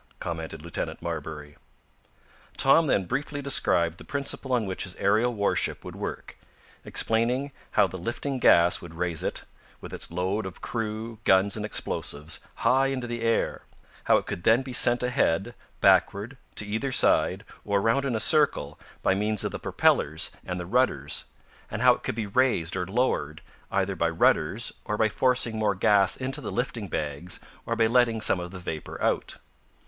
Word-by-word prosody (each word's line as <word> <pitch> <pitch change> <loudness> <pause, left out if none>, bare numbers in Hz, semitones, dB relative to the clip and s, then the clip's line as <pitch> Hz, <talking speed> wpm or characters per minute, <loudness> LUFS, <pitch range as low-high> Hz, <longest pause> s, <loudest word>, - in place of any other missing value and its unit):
commented 80 -2 -5
Lieutenant 85 - -4
Marbury. 75 -3 -6 1.0
Tom 150 +4 +5
then 100 -8 +1
briefly 145 +7 -3
described 90 - +2
the - - -10
principle 140 -1 -2
on 120 -3 +1
which 95 -1 -2
his 90 - -4
aerial 110 +5 +2
warship 100 -3 -1
would - - -8
work, - - -6 0.4
explaining 125 +5 +1 0.2
how - - +5
the 95 - -6
lifting 130 +7 -3
gas 85 -6 +5
would 85 -1 -11
raise 85 -2 -1
it, - - -2 0.4
with - - -10
its - - -1
load 95 +4 -2
of 95 - -10
crew, 110 -1 -4
guns 95 +1 +3
and 105 - -4
explosives, 75 -7 -2 0.2
high 135 +1 +2
into 130 -2 -3
the 120 -1 -4
air; 115 0 0 0.4
how - - +5
it - - -3
could 85 - -5
then 115 +7 +4
be 130 -1 -7
sent 120 0 +5
ahead, 120 -4 0 0.3
backward, 105 +6 +3 0.2
to 105 - -2
either 110 +6 -2
side, - - +2 0.2
or 100 -1 +1
around 115 +7 +1
in 135 -4 -1
a - - 0
circle, 125 - +2 0.2
by - - +3
means 105 +1 0
of - - -2
the - - -5
propellers 75 +2 +1
and 90 -1 -4
the 90 - -5
rudders, 90 - 0 0.4
and - - -3
how - - +7
it - - -8
could - - -3
be 110 -2 -2
raised 100 -6 +1
or 90 -2 -2
lowered, 95 - -1 0.3
either 100 0 0
by 85 -1 +1
rudders 85 +5 +1
or 105 - -3
by 110 - +3
forcing 120 -1 +1
more 105 -2 +1
gas 100 0 +3
into 135 +3 -3
the 115 - -5
lifting 120 -4 -3
bags, 75 +2 -2 0.3
or 115 - 0
by 115 -1 +3
letting 115 -1 +3
some 100 - +4
of 90 0 -6
the 95 - -9
vapor 80 -4 -6
out. - - -1
105 Hz, 175 wpm, -26 LUFS, 90-125 Hz, 1.0 s, how